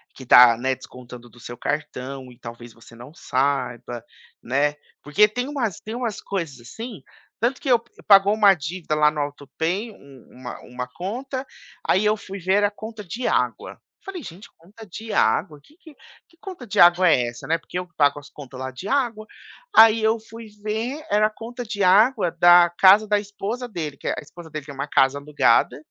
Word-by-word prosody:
que 130 - -11
está, 120 -2 +7
né, 130 +2 -1
descontando 125 -1 -13
do 120 - -19
seu 120 0 -9
cartão 135 -3 -5
e 120 - -19
talvez 120 -1 -10
você 115 0 -17
não 125 +6 -13
saiba", 125 -5 -2 0.4
né. 145 +4 0 0.3
Porque 155 +9 +4
tem 245 +4 -4
umas 235 - -3
tem 220 +2 -7
umas 235 -4 -4
coisas 165 -10 -5
assim, 220 - -9 0.4
tanto 245 +3 0
que 270 - -4
eu 240 -2 +5
p 230 - -29 0.2
pagou 200 0 +6
uma 210 -2 +5
dívida 160 0 -4
lá 150 0 +4
no 150 - -6
autopay, 160 - -4
um 140 - -17
uma 125 0 -9
uma 125 0 -7
conta. 255 - -6 0.4
Aí 190 +4 +2
eu 210 +1 +3
fui 200 0 -9
ver, 185 +2 0
era 205 0 +2
conta 220 +1 -9
de 220 +8 -4
água. - - -1 0.3
Falei: 375 -7 -7
"Gente, 180 +6 -11
conta 200 +7 -15
de 220 +4 -8
água? 145 +7 +1
Que 295 - -24
que 320 -4 -16 0.3
que 335 - -28
conta 365 -9 -9
de 200 - -3
água 175 +1 +6
é 125 -5 +3
essa, 120 - -9
né?". 165 +1 +1
Porque 175 - -8
eu 180 - -5
que 175 - -38
pago 145 -1 +3
as 145 - -15
contas 135 -3 -11
lá 130 0 -5
de 130 +10 -9
água. 235 -5 -1 0.5
Aí 225 0 +7
eu 220 +1 +2
fui 225 +1 -12 0.2
ver, 235 +8 -3
era 210 +1 +4
a - - -6
conta 235 +3 -8
de 205 -2 -3
água 200 0 +4
da 175 0 +6
casa 200 +3 +7
da 210 0 +2
esposa 210 +4 -5
dele, 155 - -6
que - - -8
é - - +1
a - - -4
esposa 170 -2 -13
dele 155 -2 -7
tem 145 - -9
uma 140 +2 -4
casa 135 0 +2
alugada, 145 -5 +2
175 Hz, 205 wpm, -22 LUFS, 140-220 Hz, 0.5 s, está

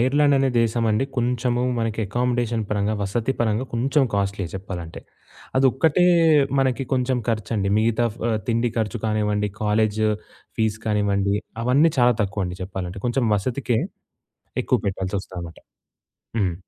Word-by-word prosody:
Ireland 145 +3 +4
అనే 135 0 +3
దేశం 115 0 +1
అండి 110 +5 +2
కొంచెము 125 0 0 0.2
మనకి 115 -1 -2
అకమోడేషన్ 120 0 0
పరంగా 105 +1 0
వసతి 115 +6 -1
పరంగా 110 +1 +1
కొంచెం 135 +4 +2
కాస్ట్‌లీయె 100 -2 -1
చెప్పాలంటే. 90 -4 -6 0.6
అదొక్కటే 140 +6 +3 0.5
మనకి 130 0 +1
కొంచెం 130 -1 +1
ఖర్చండి. 110 -2 -1
మిగతా 115 +1 +2
ఫ - - -16 0.3
తిండి 115 +1 +1
ఖర్చు 110 0 -1
కానివ్వండి, 105 -1 0
కాలేజ్ 105 0 +1 0.6
ఫీజ్ 110 -1 0
కానివ్వండి. 100 -2 +1 0.3
అవన్నీ 140 +7 +4
చాలా 120 0 +5
తక్కువండి 95 -3 -3
చెప్పాలంటే. 95 0 -5
కొంచెం 120 +1 +1
వసతికే 120 +2 -1 0.9
ఎక్కువ - - +2
పెట్టాల్సొస్తుందనమాట. 95 -3 -4 0.8
హ్మ్. 95 -5 +1
110 Hz, 120 wpm, -23 LUFS, 100-125 Hz, 0.9 s, చాలా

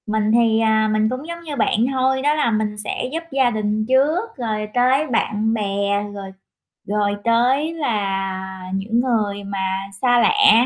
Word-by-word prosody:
Mình 215 0 0
thì, 225 -1 +3
à, 220 -1 +2
mình 215 0 +2
cũng 255 +5 -5
giống 340 0 -6
như 305 -3 -5
bạn 220 -5 +1 0.2
thôi, 265 0 +1
đó 295 +2 +2
là 300 -6 +1
mình 215 -1 -1
sẽ 210 +4 -3
giúp 330 +2 -3
gia 265 -2 +3
đình 215 -1 -1
trước, 300 - +1
rồi 215 -3 -3
tới 260 +5 +2
bạn 220 -2 0
bè, 200 -1 -1
rồi 195 -1 -8 0.6
rồi 205 0 0
tới 255 +7 +2
là 195 - -3
những 215 +5 -1
người 215 -5 0
mà 195 0 -3
xa 245 -1 +4
lạ. 415 - +5
220 Hz, 170 wpm, -20 LUFS, 205-260 Hz, 0.6 s, lạ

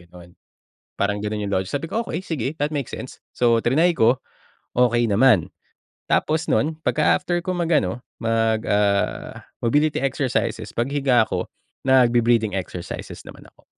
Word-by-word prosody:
gano'n. 85 0 -16 0.7
Parang 105 +1 +1
gano'n 105 0 -3
yung 100 - -3
logic 95 0 -1
sabi 145 +3 -3
ko, 230 +7 -2
"Okey, - - -4
sige, 140 -9 -3
that 150 +1 -1
makes 140 -4 -3
sense." - - -8
So 115 -2 +2
triny 165 +8 +3
ko, 120 +1 +3 0.6
okey 120 -1 +3
naman. 105 -3 +3 0.6
Tapos 155 +1 +1
nun 155 +2 +1
pagka-after 175 +3 +1
ko 185 +1 -3
mag-ano, 145 - 0 0.2
mag 115 -1 +1
ah, 100 -1 0 0.2
mobility 145 +6 +2
exercises, 125 -5 -1
paghiga 130 -1 +2
ko 90 -4 -3 0.4
nagbe-breathing 120 -4 +4
exercises 90 -2 -6
naman - - -13
ako. - - -25
120 Hz, 140 wpm, -22 LUFS, 105-145 Hz, 0.7 s, nagbe-breathing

